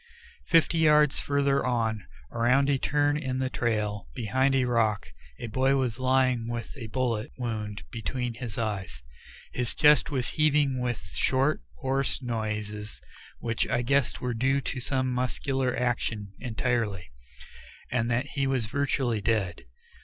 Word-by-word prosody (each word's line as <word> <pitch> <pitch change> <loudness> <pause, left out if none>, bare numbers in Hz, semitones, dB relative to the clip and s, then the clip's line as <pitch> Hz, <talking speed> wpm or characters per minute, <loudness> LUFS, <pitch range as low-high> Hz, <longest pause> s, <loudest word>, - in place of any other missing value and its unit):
Fifty 165 -1 +4
yards 150 -2 +5
farther 140 -1 +1
on, 115 -4 -1 0.2
around 130 +4 +3
a 135 - +1
turn 145 +1 +2
in 130 -4 -2
the 130 0 -1
trail, 105 -3 -1
behind 130 +4 +1
a 130 -1 +3
rock, 115 -4 +1 0.3
a - - -6
boy 130 +4 +2
was 130 -3 -1
lying 130 -2 +2
with 120 +2 -5
a 120 -5 -7
bullet 120 0 -1
wound 110 -4 -4
between 120 +1 -3
his 115 -2 -7
eyes. 100 - -3 0.5
His 125 -2 -2
chest 150 0 +5
was 130 -4 -1
heaving 150 -3 +2
with 120 -1 -3
short, 135 +3 +1
hoarse 135 - -1
noises 105 -3 -4 0.4
which 115 -1 -1
I 120 - +1
guessed 140 +1 +1
were 125 -1 -1
due 135 +4 +2
to 135 - -4
some 130 +1 0
muscular 130 +1 -1
action 115 -5 -1
entirely, 115 -6 -2 0.8
and 120 -1 +1
that 125 +3 +1
he 140 -1 -1
was 130 -4 0
virtually 130 -2 0
dead. 100 - -1
125 Hz, 145 wpm, -28 LUFS, 115-135 Hz, 0.8 s, yards